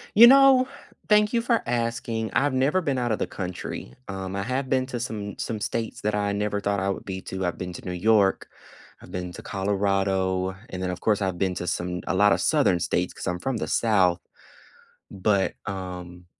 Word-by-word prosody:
You 235 +3 +10
know, 265 -1 +7 0.4
thank 210 +1 +4
you 235 - +2
for 235 -1 +1
asking. 115 -2 -2
I've 145 0 +2
never 140 +8 +2
been 140 -6 -1
out 120 -2 0
of 110 - 0
the - - -1
country. 90 -2 -6
Um, 95 -1 -5
I 100 - -2
have 130 +3 -2
been 130 -1 +2
to 125 -2 -4
some 105 -3 -5
some 110 -2 -3
states 115 +2 -3
that 105 0 0
I 100 -1 0
never 105 0 -1
thought 100 0 0
I 95 +1 0
would 100 - -4
be 95 -1 -5
to, 95 0 -4
I've 85 -1 -2
been 90 -1 -5
to - - -10
New 90 - -3
York, 100 +1 +2 0.5
I've - - -13
been 90 -1 -4
to - - -8
Colorado, 95 -1 0
and 95 - -6
then, 90 - -1
of 90 - -4
course, 105 -2 +1
I've 95 -2 -1
been 95 0 0
to 90 - -4
some 90 0 -2
a - - 0
lotta 105 +2 +5
Southern 90 - +3
states - - -1
'cause - - -7
I'm 90 0 -1
from 130 +5 -2
the - - -3
South. 95 -6 +3 0.9
But, 100 0 +1
um, 90 -2 -6
100 Hz, 210 wpm, -25 LUFS, 95-120 Hz, 0.9 s, You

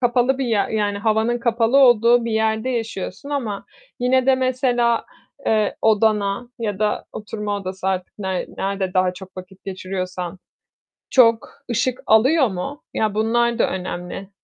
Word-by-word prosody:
kapalı 250 +2 +2
bir 265 - 0
yer, 220 -4 +1
yani, 205 -2 -1
havanın 220 +3 +1
kapalı 235 +2 +2
olduğu 240 -2 +5
bir 230 - -2
yerde 220 +3 0
yaşıyorsun 225 +2 -4
ama 230 -9 -3 0.3
yine 255 +1 +2
de 265 - +6
mesela, 250 -2 +1 0.4
eee, 215 -2 +1
odana 215 0 +2
ya 210 -4 -3
da 215 -1 0
oturma 210 -1 -4
odası 190 -1 -5
artık 185 +1 -3
ner 190 -2 -2
nerede 195 -1 -2
daha 185 0 +2
çok 190 +1 -12
vakit 185 +1 -11
geçiriyorsan, 185 -1 -5 0.7
çok 230 -3 +4 0.2
ışık 250 +2 0
alıyor 260 +6 +4
mu? 215 +9 -5
Ya, 215 -2 0
bunlar 235 +2 +1
da - - +3
önemli. 180 +1 -5
220 Hz, 145 wpm, -21 LUFS, 195-240 Hz, 0.7 s, de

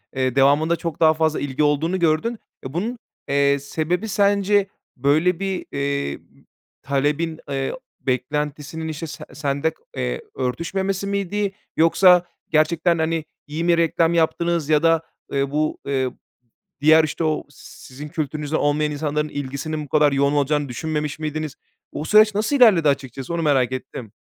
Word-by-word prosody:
eee, 130 -1 0
devamında 145 +5 +4
çok 165 -2 -5
daha 160 -1 +6
fazla 160 0 0
ilgi 145 +1 -1
olduğunu 160 +5 +1
gördün 170 +8 +1 0.3
ve 130 - -6
bunun, 225 +8 -2 0.3
eee, 140 0 +3
sebebi 165 +8 -2
sence 200 0 +2 0.3
böyle 155 +7 +2
bir, 195 -2 -3
eee, 140 - -2 0.6
talebin, 150 +4 -1
eee, 135 -1 -2 0.3
beklentisinin, 150 +4 -2
işte, 160 +1 -5
se - - -8
sende, 145 +1 -1 0.3
eee, 60 0 -2
örtüşmemesi 190 +10 -2
miydi 200 0 -1 0.3
yoksa 180 +2 +6 0.3
gerçekten, 165 +2 +2
hani, 160 0 -1 0.2
iyi 155 +3 -3
mi 170 -1 +3
reklam 165 0 +2
yaptınız 170 -1 +1
ya 155 +1 +3
da, 165 -1 +4 0.3
eee, 140 0 0
bu, 155 +1 0
eee, 130 -2 0 0.7
diğer, 155 +1 +6
işte, 155 +2 -2
o 155 -1 0
si - - -14
sizin 140 +4 -9
kültürünüzden 155 -1 -2
olmayan 150 +1 +1
insanların 150 0 -2
ilgisinin 145 +2 -4
bu - - -17
kadar 150 -1 +4
yoğun 140 +1 +2
olacağını 145 -1 +1
düşünmemiş 150 +3 -3
miydiniz? 155 -1 -4 0.4
O 155 - -5
süreç 215 +1 +5
nasıl 215 +7 +1
ilerledi 195 - +6
açıkçası 135 +2 -3
onu 170 - -1
merak 135 -5 +2
ettim. 130 -4 -6
155 Hz, 150 wpm, -22 LUFS, 140-170 Hz, 0.7 s, daha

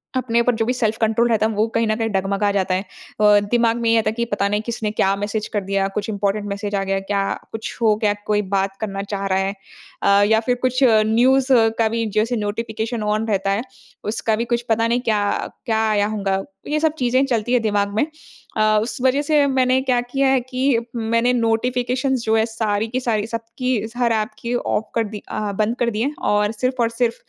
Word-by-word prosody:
अपने 235 -2 +1
ऊपर 245 -1 +1
जो 225 0 0
भी 250 - 0
सेल्फ़ 220 -3 0
कंट्रोल 225 +1 +2
रहता 220 -1 +2
है, 220 - +1
वो 215 +2 +1
कहीं 230 -1 +2
न 215 - +1
कहीं 225 -1 -1
डगमगा 200 +1 0
जाता 190 -2 0
है। 185 - 0 0.4
अ, 210 -1 +6
दिमाग 235 -1 +3
में 230 - +1
ये 230 - +4
आता 215 - 0
है - - -3
कि 235 0 -1
पता 205 -3 -1
नहीं 210 +1 0
किसने 225 -3 -2
क्या 195 -2 +1
मैसेज 205 +1 -3
कर 205 - +1
दिया, 195 0 0
कुछ 210 +1 -2
इंपोरटेंट 205 0 -1
मैसेज 200 0 -3
आ 195 - 0
गया 195 0 -1
क्या, 195 0 -1 0.3
कुछ 225 0 -6
हो 215 -2 +4
गया, 205 -1 +3
कोई 210 0 +2
बात 195 0 0
करना 195 -2 -3
चाह 200 -1 -2
रहा 190 0 +1
है। 195 +1 -1 0.5
अ, 200 0 +5
या 220 0 +4
फिर 250 - +3
कुछ 255 0 +1 0.3
न्यूज़ 255 +4 +3 0.3
का 225 - +4
भी 230 0 -1
जैसे 230 +3 +2
नोटिफिकेशन 220 +1 -3
ऑन 215 +1 0
रहता 195 -1 0
है, 205 +3 0 0.4
उसका 220 +1 0
भी 230 +2 -2
कुछ 235 - +1
पता 225 +1 +2
नहीं 240 +1 +1
क्या 215 -4 +1
अ, - - -2 0.2
क्या 220 -2 +1
आया 205 -1 +2
होगा, 195 -3 -1
तो 290 +3 -15
ये 305 - +2
सब 315 -1 +1
चीज़ें 255 +2 +2
चलती 240 -1 -1
हैं 245 - +3
दिमाग 205 -2 0
में। 255 - +2 0.5
अ, 215 0 +4
उस 240 - -4
वजह 260 +2 +3
से 295 -1 +3
मैंने 260 -1 +2
क्या 255 -2 +1
किया 270 +3 0
है 265 -1 +4
कि 255 0 0 0.2
मैंने 230 +2 +1
नोटिफिकेशन्स 250 +2 0
जो 220 0 +2
हैं 220 0 +3
सारी 220 -1 -1
की 250 +3 -2
सारी, 220 -4 -1
सबकी 230 0 -3
स 225 - -15
हर 240 -2 +2
ऐप 215 +1 0
की, 235 +1 -3
ऑफ 220 -2 -1
कर 230 - +2
दी 210 - -6
अ, 210 -1 -2
बंद 220 +3 +1
कर 240 -1 +2
दी 215 0 -3
हैं, 285 +4 0 0.2
और 210 +1 +2
सिर्फ़ 255 +3 -2
और 230 - +2
सिर्फ़ 230 0 0
225 Hz, 235 wpm, -21 LUFS, 210-240 Hz, 0.5 s, अ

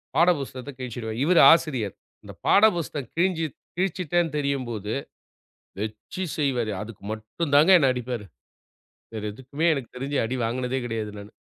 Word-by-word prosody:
பாட 170 +2 +5
புஸ்தகத்த 135 0 -6
கிழிச்சிடுவேன். 115 -3 -5
இவரு 175 +2 +5
ஆசிரியர். 130 - +1 0.3
இந்த - - -10
பாட 205 +2 +6
புஸ்தகம் 150 -6 -4
கிழிஞ்சு 170 -2 +1 0.3
கிழிச்சுட்டேன்னு 175 -3 0
தெரியும்போது, 120 -7 -2 0.9
வெச்சு 110 - -5
செய்வாரு. 125 -7 0
அதுக்கு 105 -2 -10
மட்டும் 110 +8 -4
தாங்க, 155 +6 +6
என்னை 135 -4 +4
அடிப்பாரு. 125 -3 -4 0.9
வேறு 110 -1 -4
எதுக்குமே 130 +7 -3
எனக்கு 135 -5 -4
தெரிஞ்சு 135 +2 -2
அடி 125 +3 -2
வாங்குனதே 125 +2 -1
கிடையாது 110 -3 -3
நானு. 100 +1 -11
130 Hz, 135 wpm, -25 LUFS, 115-160 Hz, 0.9 s, பாட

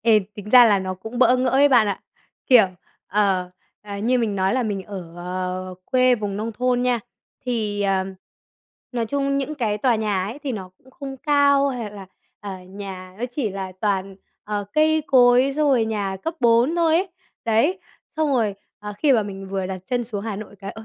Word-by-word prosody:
Ê, 225 -2 +5 0.2
tính 210 0 -9
ra 250 -1 +9
là 210 -3 +4
nó 185 0 -3
cũng 220 +6 -8
bỡ 255 0 +5
ngỡ 255 0 +1
ấy 275 +3 +5
bạn 240 -5 +5
ạ, 200 -2 -2 0.5
kiểu, 245 -5 +7 0.4
ờ, 195 -3 +1 0.3
à, 205 -1 -7
như 245 +5 +1
mình 215 -4 -1
nói 190 +2 +1
là 260 - +1
mình 205 -4 -2
ở, 185 -4 -9 0.6
à, - - -8
quê 255 -1 +3
vùng 205 -3 -4
nông 220 +2 -3
thôn 245 +2 0
nha, 250 -2 +1 0.5
thì, 215 -4 -1
ờm, 190 -1 0 0.8
nói 235 -2 -1
chung 275 +2 0
những 280 +2 -3
cái 215 -7 -1
tòa 245 +1 +2
nhà 210 -4 0
ấy 220 +8 -6
thì 285 -3 -4
nó 190 -5 -6
cũng 260 - -21
không 270 0 -8
cao, 280 0 +3
hay 240 -5 -4
là, 200 -2 -10 0.3
ờ, 205 - -6 0.2
nhà 190 -2 -8
nó 240 - -2
chỉ 245 -4 -2
là 190 -1 -5
toàn, 195 -2 -1 0.3
ờ, 205 -1 -3
cây 315 0 +3
cối 250 +1 +5
xong 300 -1 +2
rồi 245 -5 +3
nhà 205 -3 -2
cấp 325 - -3
bốn 240 +6 +4
thôi 325 -2 +3
ấy. 380 +3 0 0.4
Đấy, 255 - +2 0.4
xong 310 -1 +1
rồi, 230 -7 +1 0.2
à, 210 0 -7
khi 295 -3 +4
mà 230 -4 +3
mình 195 -1 -7
vừa 190 -1 -2
đặt 190 0 -4
chân 245 -1 -1
xuống 210 -3 -5
Hà 220 -3 -3
Nội 205 0 -9
cái 195 0 -7
"Ôi, 220 - -11
225 Hz, 210 wpm, -22 LUFS, 200-255 Hz, 0.8 s, ra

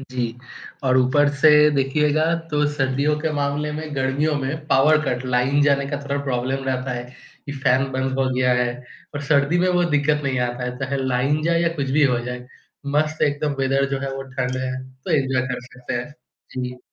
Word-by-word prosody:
जी, 125 -3 -4 0.5
और 130 0 +3
ऊपर 145 +3 +3
से 155 +3 +5 0.3
देखिएगा 150 +3 +2 0.3
तो 150 0 +1
सर्दियों 140 +2 0
के 160 - -1
मामले 145 +1 -1
में 155 0 -5
गर्मियों 140 +3 0
में 145 +3 -4
पावर 150 +2 +4
कट 125 -2 -2
लाइन 125 +3 +2
जाने 140 -1 +2
का 145 - -1
थोड़ा 140 0 -2
प्रॉब्लम 130 +1 -2
रहता 130 0 -2
है 120 - -4 0.4
कि 140 - -4
फैन 135 0 +1
बंद 130 0 -1
हो 135 -1 +2
गया 125 0 +2
है 120 - 0 0.5
और 145 - -4
सर्दी 140 +3 +2
में 180 +1 +2
वो 180 -1 +2
दिक्कत 150 0 +2
नहीं 130 -2 0
आता 120 +1 -5
है 125 0 -4
चाहे 140 +1 -2
लाइन 130 +4 +1
जाए 170 +1 +2
या 170 - +3
कुछ 135 -2 -2
भी 150 +1 +4
हो 125 -3 +2
जाए। 125 0 -6 0.5
मस्त 155 +1 0
एकदम 145 0 0
वेदर 135 +1 +2
जो 135 - -1
है 135 -1 -4
वो 135 - -5
ठंड 130 -1 -3
है 130 0 -2 0.3
तो - - -5
एन्जॉय 135 -2 +1
कर 125 - -3
सकते 125 0 -7
हैं। 125 +4 -4 0.4
जी। 125 -1 -5
135 Hz, 200 wpm, -22 LUFS, 130-150 Hz, 0.5 s, से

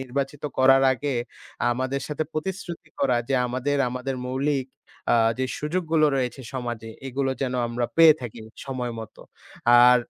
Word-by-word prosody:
নির্বাচিত 135 +2 -3 0.2
করার 135 +1 +6
আগে 140 +1 -2 0.6
আমাদের 130 +3 -1
সাথে 150 +1 -2
প্রতিশ্রুতি 175 +1 -5
করা 130 -3 +3
যে 135 - +1
আমাদের, 130 +4 -1
আমাদের 125 +2 -3
মৌলিক 135 +1 0 0.5
আ - - +6 0.2
যে 130 - +1
সুযোগগুলো 160 0 +1
রয়েছে 130 0 -2
সমাজে 120 -3 -4 0.2
এগুলো 135 +1 -1
যেন 130 -1 -1
আমরা 120 0 -1
পেয়ে 165 -2 +8
থাকি 120 -2 -7 0.2
সময় 125 -3 -3
মতো। 110 - -10 0.6
আর 125 0 +8
135 Hz, 145 wpm, -25 LUFS, 125-145 Hz, 0.6 s, পেয়ে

